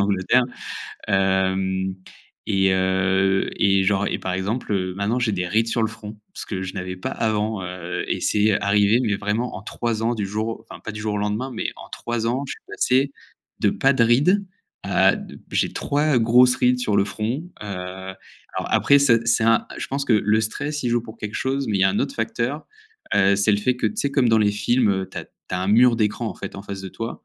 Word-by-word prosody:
Angleterre, 100 Hz, +5 st, +2 dB, 0.6 s
hem 95 Hz, -1 st, +1 dB, 0.5 s
et 95 Hz, -1 st, +3 dB
heu 95 Hz, +1 st, +1 dB
et 100 Hz, -1 st, +3 dB
genre 100 Hz, 0 st, +2 dB
et -, -, -1 dB
par 95 Hz, -, -3 dB
exemple 105 Hz, +5 st, -2 dB
heu, 95 Hz, -2 st, -1 dB
maintenant, 105 Hz, +5 st, 0 dB
j'ai 120 Hz, -3 st, 0 dB
des 90 Hz, -2 st, -1 dB
rides 110 Hz, +5 st, +1 dB
sur 115 Hz, 0 st, 0 dB
le 110 Hz, -, +1 dB
front, 105 Hz, -1 st, -10 dB
ce -, -, -7 dB
que 95 Hz, -3 st, -4 dB
je 95 Hz, -, -5 dB
n'avais 90 Hz, -1 st, -5 dB
pas 90 Hz, -, -4 dB
avant, 110 Hz, -2 st, -1 dB
heu, 90 Hz, 0 st, -4 dB
et -, -, -1 dB
c'est, 105 Hz, 0 st, +3 dB
heu, -, -, +3 dB
arrivé 100 Hz, +3 st, +3 dB
mais 105 Hz, -4 st, 0 dB
vraiment 105 Hz, +4 st, -2 dB
en 95 Hz, -, -8 dB
3 115 Hz, 0 st, -3 dB
ans 120 Hz, +1 st, +1 dB
du 105 Hz, -3 st, -2 dB
jour 110 Hz, +3 st, -2 dB
au 115 Hz, 0 st, -7 dB
enfin -, -, -10 dB
pas 110 Hz, -, -6 dB
du 105 Hz, -, -7 dB
jour 105 Hz, -1 st, -1 dB
au -, -, -1 dB
lendemain, 105 Hz, +6 st, -2 dB
mais -, -, -3 dB
en -, -, -12 dB
3 120 Hz, -1 st, -3 dB
ans 125 Hz, +4 st, -1 dB
je -, -, -5 dB
suis -, -, -12 dB
passé 135 Hz, +2 st, +1 dB, 0.5 s
de -, -, +2 dB
pas 135 Hz, +1 st, +3 dB
de 120 Hz, -, +2 dB
rides, 180 Hz, -, +3 dB, 0.4 s
à -, -, +3 dB
d -, -, -10 dB
j'ai -, -, 0 dB
3 145 Hz, -1 st, +1 dB
grosses 125 Hz, +2 st, +5 dB
rides 125 Hz, 0 st, +2 dB
sur 105 Hz, -5 st, 0 dB
le 100 Hz, -, +4 dB
front, 110 Hz, +8 st, -3 dB, 0.2 s
heu, -, -, -7 dB
alors 95 Hz, 0 st, -7 dB
après 140 Hz, 0 st, +4 dB
ça, 135 Hz, -4 st, +5 dB
c'est 115 Hz, 0 st, +2 dB
un 115 Hz, 0 st, +3 dB
je -, -, -4 dB
pense 140 Hz, +1 st, -2 dB
que 120 Hz, -, +1 dB
le 105 Hz, +1 st, +3 dB
stress 145 Hz, +6 st, -3 dB
y -, -, +1 dB
joue 120 Hz, 0 st, +2 dB
pour 110 Hz, 0 st, -11 dB
quelque 105 Hz, 0 st, -6 dB
chose 135 Hz, +1 st, -1 dB
mais 105 Hz, -3 st, 0 dB
il -, -, +1 dB
y -, -, +5 dB
a -, -, +5 dB
un 100 Hz, -, -1 dB
autre -, -, -1 dB
facteur, 120 Hz, +6 st, -2 dB, 0.5 s
heu, 100 Hz, 0 st, +5 dB
c'est 100 Hz, +2 st, +2 dB
le 100 Hz, -, +3 dB
fait 125 Hz, +4 st, +1 dB
que -, -, 0 dB
tu 215 Hz, -, -10 dB
sais? 140 Hz, -, 0 dB
Comme 130 Hz, -4 st, +3 dB
dans 115 Hz, -, +4 dB
les 105 Hz, -1 st, +3 dB
films, 110 Hz, +3 st, +2 dB
heu, 95 Hz, -1 st, -1 dB
tu -, -, -6 dB
as -, -, -6 dB
tu -, -, -10 dB
as 90 Hz, -, -1 dB
un -, -, -2 dB
mur 120 Hz, +3 st, +6 dB
d'écran, 110 Hz, +1 st, 0 dB
en -, -, -6 dB
fait, 100 Hz, -, -7 dB
en 100 Hz, -, -7 dB
face 100 Hz, -1 st, -6 dB
de 95 Hz, -, -6 dB
toi, 115 Hz, +4 st, -7 dB
105 Hz, 240 wpm, -22 LUFS, 95-120 Hz, 0.6 s, mur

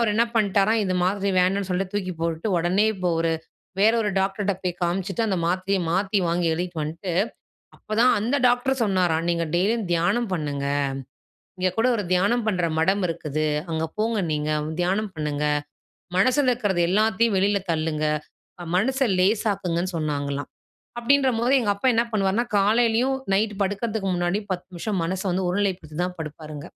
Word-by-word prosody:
அவரு 225 Hz, -3 st, +2 dB
என்ன 235 Hz, +1 st, +4 dB
பண்ட்டாராம், 210 Hz, +1 st, +3 dB
இந்த 185 Hz, -1 st, -1 dB
மாத்திர 195 Hz, +1 st, 0 dB
வேணான்னு 190 Hz, +1 st, +1 dB
சொல்லிட்டு 185 Hz, +1 st, -2 dB
தூக்கி 185 Hz, -3 st, -2 dB
போட்டுட்டு, 165 Hz, +5 st, -1 dB
ஒடனே 185 Hz, +5 st, +2 dB
இப்போ 185 Hz, -2 st, -2 dB
ஒரு 165 Hz, 0 st, +1 dB, 0.5 s
வேற 220 Hz, +3 st, +5 dB
ஒரு 210 Hz, -, 0 dB
டாக்டர்ட்ட 195 Hz, +1 st, 0 dB
போய் 180 Hz, -1 st, -2 dB
காமிச்சுட்டு, 195 Hz, +5 st, -1 dB
அந்த 190 Hz, -3 st, 0 dB
மாத்திரைய 185 Hz, +3 st, 0 dB
மாத்தி 195 Hz, +3 st, +1 dB
வாங்கி 170 Hz, 0 st, +1 dB
எழுதிட்டு 175 Hz, -1 st, -3 dB
வந்துட்டு, 165 Hz, +4 st, -4 dB, 0.7 s
அப்பதான் 225 Hz, +4 st, +2 dB
அந்த 235 Hz, +7 st, 0 dB
டாக்டர் 245 Hz, +1 st, +1 dB
சொன்னாராம் 180 Hz, -5 st, +1 dB
நீங்க 170 Hz, 0 st, 0 dB
டெய்லியும் 205 Hz, +3 st, +1 dB
தியானம் 190 Hz, +7 st, +1 dB
பண்ணுங்க. 145 Hz, -4 st, -2 dB, 0.9 s
இங்க 185 Hz, 0 st, +2 dB
கூட 225 Hz, +3 st, +2 dB
ஒரு 210 Hz, -, -2 dB
தியானம் 205 Hz, +6 st, +2 dB
பண்ற 185 Hz, -5 st, +1 dB
மடம் 190 Hz, +5 st, +2 dB
இருக்குது. 155 Hz, -2 st, -2 dB, 0.2 s
அங்க 160 Hz, 0 st, -1 dB
போங்க 220 Hz, 0 st, 0 dB
நீங்க, 150 Hz, 0 st, -1 dB, 0.3 s
தியானம் 195 Hz, +3 st, 0 dB
பண்ணுங்க. 150 Hz, -2 st, -2 dB, 0.7 s
மனசுல 255 Hz, +7 st, +3 dB
இருக்றது 205 Hz, -7 st, 0 dB
எல்லாத்தையும் 220 Hz, +3 st, +2 dB
வெளில 200 Hz, +1 st, +2 dB
தள்ளுங்க. 155 Hz, -1 st, -1 dB, 0.7 s
மனச 265 Hz, +8 st, +2 dB, 0.2 s
லேசாக்குங்கன்னு 190 Hz, -3 st, +1 dB
சொன்னாங்களாம். 145 Hz, -2 st, -2 dB, 0.5 s
அப்படின்றபோது 255 Hz, -1 st, +2 dB
எங்க 225 Hz, -4 st, -1 dB
அப்பா 200 Hz, +6 st, -1 dB
என்ன 230 Hz, -, +3 dB
பண்ணுவாருன்னா 205 Hz, +2 st, +1 dB
காலையிலயும், 230 Hz, +5 st, +2 dB, 0.2 s
நைட் 210 Hz, +2 st, +1 dB
படுக்கறதுக்கு 205 Hz, +1 st, -1 dB
முன்னாடியும் 175 Hz, +4 st, -1 dB
10 180 Hz, -1 st, -3 dB
நிமிஷம் 195 Hz, +4 st, -3 dB
மனச 185 Hz, +3 st, -2 dB
வந்து 185 Hz, +1 st, 0 dB
ஒருநிலைப்படுத்தி 180 Hz, -5 st, -2 dB
தான் 180 Hz, 0 st, -3 dB
படுப்பாருங்க. 150 Hz, -1 st, -7 dB
195 Hz, 150 wpm, -24 LUFS, 175-215 Hz, 0.9 s, வேற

